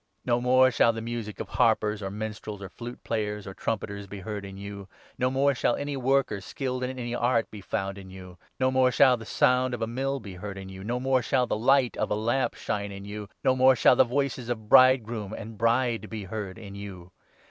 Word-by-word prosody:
No 120 -1 +2
22 - - -7
more 130 +1 +5
shall 115 -1 +4
the 115 - -5
music 115 -3 -5
of - - -4
harpers, 105 0 +2
or 95 - -3
minstrels, 105 0 -6
or 100 -1 -8
fluteplayers, 105 -2 -4
or 95 - -7
trumpeters 100 -1 -4
be 100 0 -8
heard 105 0 -5
in 95 0 -9
you; 100 -1 -8 0.3
no 125 - +2
more 135 +2 +2
shall 125 - +1
any 145 0 -3
worker, 135 -5 +1
skilled 130 +4 -4
in 130 +1 -3
any 120 -1 -4
art, 120 -1 +1
be 105 - -9
found 95 0 -3
in 95 -1 -11
you; 90 -2 -11 0.2
no 130 0 +2
more 130 -1 +4
shall 130 0 +6
the 110 -3 -10
sound 125 0 +2
of 115 - -9
a - - +2
mill 135 +4 -2
be 100 -5 -9
heard 100 +2 -7
in 95 0 -8
you; 95 0 -9
no 120 +4 -2
more 130 0 +2
shall 125 +2 +1
the - - -1
light 125 +3 +3
of - - -1
a - - +1
lamp 120 +5 0
shine 100 0 -3
in 100 0 -8
23 100 - -9
you; 105 -1 -6
no 130 -2 +3
more 130 0 +6
shall 125 - +5
the - - +6
voices 130 -1 -2
of 110 -3 -3
bridegroom 115 -5 +5
and 110 0 -8
bride 115 -1 +1
be 110 -2 -5
heard 100 0 -5
in 100 -3 -10
you. 95 -3 -9
115 Hz, 235 wpm, -27 LUFS, 100-125 Hz, 0.3 s, shall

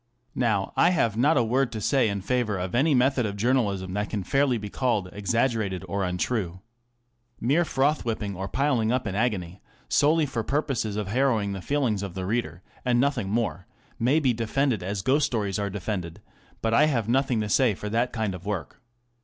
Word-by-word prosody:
Now, 110 -6 0
I 170 - +5
have 115 - +1
not 140 +7 +3
a 120 - +4
word 125 +2 +1
to 110 - -3
say 130 +1 +2
in 100 -1 -3
favour 110 -1 0
of 90 0 -4
any 140 +5 +3
method 130 0 +3
of 100 0 -5
journalism 100 -6 0
that 105 +1 -2
can 105 -3 -3
fairly 135 +2 +2
be 105 -1 -6
called 105 -4 -1
exaggerated 105 -2 0
or 100 +2 -1
untrue. 90 0 -2 0.8
Mere 145 +9 +2
froth 145 -1 +1
whipping 105 -4 -3
or 95 +2 -4
piling 130 -4 +1
up 130 0 +1
the 100 -5 -4
agony, 95 -6 -1 0.3
solely 155 +2 +3
for 120 -5 -3
purposes 135 -6 -1
of 105 -2 -3
harrowing 115 -4 +1
the 95 - -5
feelings 125 -5 0
of 100 -3 -6
the 95 -1 -3
reader, 95 -5 -2 0.2
and 125 -1 +2
nothing 125 -7 0
more, 105 -4 -1 0.3
may 130 +7 +3
be 130 -5 +2
defended 115 +1 0
as 95 +1 -3
ghost 140 +4 +3
stories 105 -7 -2
are 100 -1 -1
defended; 95 -3 -4 0.4
but 115 0 +1
I 145 +6 +6
have 115 -8 0
nothing 130 -1 +1
to 105 - -2
say 115 0 +3
for 105 - -6
that 120 +3 0
kind 110 -4 -2
of 90 -1 -8
work. 100 +3 -5
115 Hz, 195 wpm, -26 LUFS, 100-130 Hz, 0.8 s, I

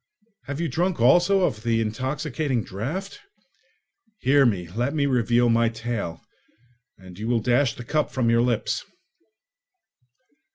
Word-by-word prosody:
Have 145 +1 -4
you 170 - 0
drunk 175 +2 -1
also 175 +11 +4
of 110 -11 0
the 115 0 +1
intoxicating 130 +3 -2
draught? 145 - -5 1.0
Hear 135 0 +4
me; 90 -6 -1
let 120 - -2
me 145 -2 +1
reveal 120 -2 +2
my 115 0 +3
tale, 110 -7 -4 0.8
and 95 0 -13
you 110 - -4
will 120 -1 +2
dash 125 +3 +1
the 125 - -8
cup 150 +4 0
from 130 -3 -1
your 115 0 +4
lips!" 120 -3 -1
120 Hz, 135 wpm, -24 LUFS, 115-145 Hz, 1.0 s, also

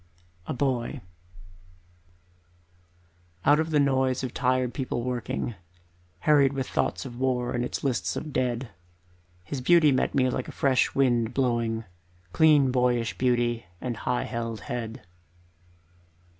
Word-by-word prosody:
A - - -2
Boy 130 0 -1 2.5
Out 145 +2 +5
of 160 +1 0
the 150 -2 +2
noise 130 -2 +1
of 130 - -4
tired 130 -1 +1
people 130 -3 -3
working, 120 -1 -3 0.7
Harried 140 -3 +4
with 135 -1 -3
thoughts - - -1
of 120 -2 -8
war 125 -2 0
and 120 - -1 0.2
lists 130 -4 -1
of 150 - -5
dead, 125 -1 -1 0.7
His 130 +9 -5
beauty 160 +1 +5
met 130 - 0
me 130 -2 +3
like 130 - -3
a - - -6
fresh 135 -2 +1
wind 120 -3 +2
blowing, 115 -4 0 0.5
Clean 150 - +5
boyish 125 -2 +1
beauty 120 -4 +1
and 120 +3 -3
high 125 +3 -1
held 115 -3 -4
head. 115 0 -5
125 Hz, 130 wpm, -26 LUFS, 120-135 Hz, 2.5 s, Out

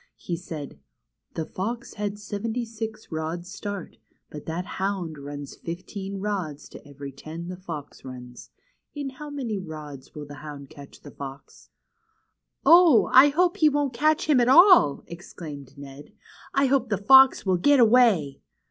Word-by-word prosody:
He 175 - -4
said: 160 - -8 0.6
The 160 - -3
fox 230 +8 -5
had 205 -1 -4
seventy 220 +3 -4
six 220 -2 -7
rods' 165 +3 -5
start, 205 -3 -7 0.3
but 150 - -10
that 170 +3 -3
hound 185 -6 -3
runs 145 0 -8
fifteen 195 +3 -7
rods 190 -8 -4
to - - -12
every 140 0 -9
ten 160 +5 -8
the 185 - -5
fox 165 -6 -9
runs. 125 -2 -10 0.5
In 285 -2 -4
how 295 +3 -9
many 250 -8 -4
rods 150 -6 -10
will 150 -1 -7
the 145 - -11
hound 145 -2 -9
catch 140 -3 -13
the 145 - -12
fox?" 140 0 -11 1.0
Oh! 335 -8 +6
I 265 +3 +8
hope 350 +4 +1
he 310 - +5
won't 285 -2 -1
catch 305 +6 +1
him 295 -4 +4
at 240 0 +3
all," 340 - +6
exclaimed 155 -5 -10
Ned. 140 +5 -12 0.4
I 275 0 +2
hope 265 -2 +1
the 205 - 0
fox 265 +6 +6
will 185 -2 +2
get 285 +10 +4
away 220 - +4
185 Hz, 155 wpm, -25 LUFS, 150-245 Hz, 1.0 s, I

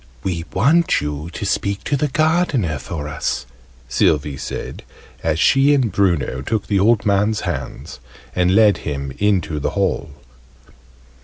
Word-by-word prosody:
"We 85 -3 -2
want 150 - +3
you 75 +2 -4
to 95 - -6
speak 100 0 -1
to 145 - 0
the 150 +2 0
Gardener 150 - +1
for 75 +3 -5
us," 75 0 -3 0.4
Sylvie 70 +2 +1
said, 65 0 -6 0.4
as 80 -1 0
she 140 - +4
and 125 -6 +1
Bruno 85 -9 0
took 105 +9 -2
the 100 -2 +1
old 110 +2 +3
man's 105 +1 +2
hands - - -5 0.4
and 90 +1 +2
led 105 -2 +5
him 70 -2 -4
into 95 -7 +1
the - - -1
hall. - - 0
95 Hz, 145 wpm, -20 LUFS, 75-110 Hz, 0.4 s, led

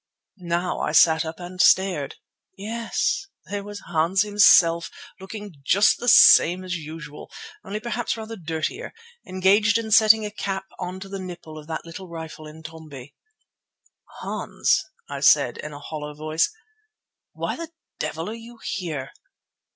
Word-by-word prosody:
Now 175 0 -2
I 150 - -2
sat 160 0 +5
up 160 +2 -7
and 180 +1 -4
stared. 180 -8 +3 0.4
Yes, 230 - -2 0.2
there 200 0 -5
was 205 0 -8
Hans 175 +4 +1
himself 180 -5 +5 0.3
looking 205 +1 -8
just 200 +9 +4
the 245 - -5
same 180 -5 +7
as 185 -1 -4
usual, 155 -2 -9 0.3
only 210 0 -5
perhaps 235 +1 -3
rather 225 0 -7
dirtier, 165 - -4 0.3
engaged 200 +4 +3
in 225 -1 -4
setting 220 0 +6
a 210 - -5
cap 195 -2 -4
on 185 +1 -5
to 195 - -7
the 195 0 -6
nipple 175 -4 -9
of 155 -1 -10
the 160 - -3
little 170 +3 -9
rifle 160 -2 -8
Intombi. 155 -3 -11 1.1
"Hans," - - 0 0.2
I - - -5
said - - +4
in 150 - -6
a 145 - -9
hollow 150 0 -7
voice, 155 - 0 0.8
"why - - -3
the 335 -1 -7 0.3
devil 165 +2 -3
are 215 - -4
you 230 +1 -11
here?" 155 -8 -4
180 Hz, 145 wpm, -24 LUFS, 160-210 Hz, 1.1 s, same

